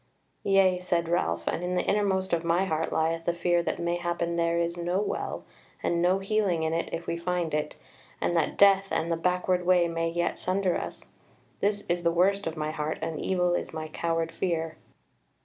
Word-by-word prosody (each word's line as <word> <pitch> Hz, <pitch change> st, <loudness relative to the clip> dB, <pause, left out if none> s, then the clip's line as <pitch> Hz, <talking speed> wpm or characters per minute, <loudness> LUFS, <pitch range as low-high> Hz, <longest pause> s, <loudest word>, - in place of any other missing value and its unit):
"Yea," 195 Hz, -2 st, +4 dB
said 175 Hz, -2 st, 0 dB
Ralph, 85 Hz, -, 0 dB
"and 170 Hz, -, -1 dB
in 180 Hz, +1 st, -1 dB
the -, -, 0 dB
innermost 195 Hz, -2 st, +1 dB
of 170 Hz, 0 st, +1 dB
my 170 Hz, +3 st, +2 dB
heart 160 Hz, -3 st, -1 dB
lieth 165 Hz, +1 st, 0 dB
the 170 Hz, -, 0 dB
fear 175 Hz, 0 st, +2 dB
that -, -, -2 dB
mayhappen 170 Hz, 0 st, -1 dB
there 170 Hz, 0 st, +1 dB
is 170 Hz, 0 st, 0 dB
no 175 Hz, +2 st, -1 dB
Well, 210 Hz, -, -3 dB, 0.4 s
and 170 Hz, 0 st, +1 dB
no 180 Hz, +2 st, +3 dB
healing 195 Hz, -4 st, 0 dB
in 160 Hz, 0 st, 0 dB
it 165 Hz, -, -1 dB
if 165 Hz, 0 st, -4 dB
we 170 Hz, -, -2 dB
find 170 Hz, -2 st, -2 dB
it, 150 Hz, 0 st, -1 dB, 0.4 s
and 175 Hz, -, 0 dB
that 165 Hz, -3 st, +1 dB
death, 195 Hz, -1 st, +5 dB
and 165 Hz, +1 st, 0 dB
the -, -, +2 dB
backward 180 Hz, +1 st, +1 dB
way 180 Hz, -1 st, +4 dB
may 165 Hz, 0 st, -1 dB
yet 170 Hz, +1 st, -1 dB
sunder 185 Hz, -1 st, 0 dB
us. -, -, -5 dB, 0.6 s
This 205 Hz, 0 st, 0 dB
is 175 Hz, 0 st, 0 dB
the 170 Hz, -, +2 dB
worst 190 Hz, +3 st, +2 dB
of 165 Hz, 0 st, -4 dB
my 155 Hz, 0 st, -2 dB
heart, 155 Hz, 0 st, -3 dB
and 160 Hz, -1 st, -3 dB
evil 180 Hz, -2 st, +1 dB
is -, -, -2 dB
my 155 Hz, -1 st, -5 dB
coward 165 Hz, +1 st, -1 dB
fear." 165 Hz, -2 st, -2 dB
170 Hz, 200 wpm, -28 LUFS, 165-180 Hz, 0.6 s, death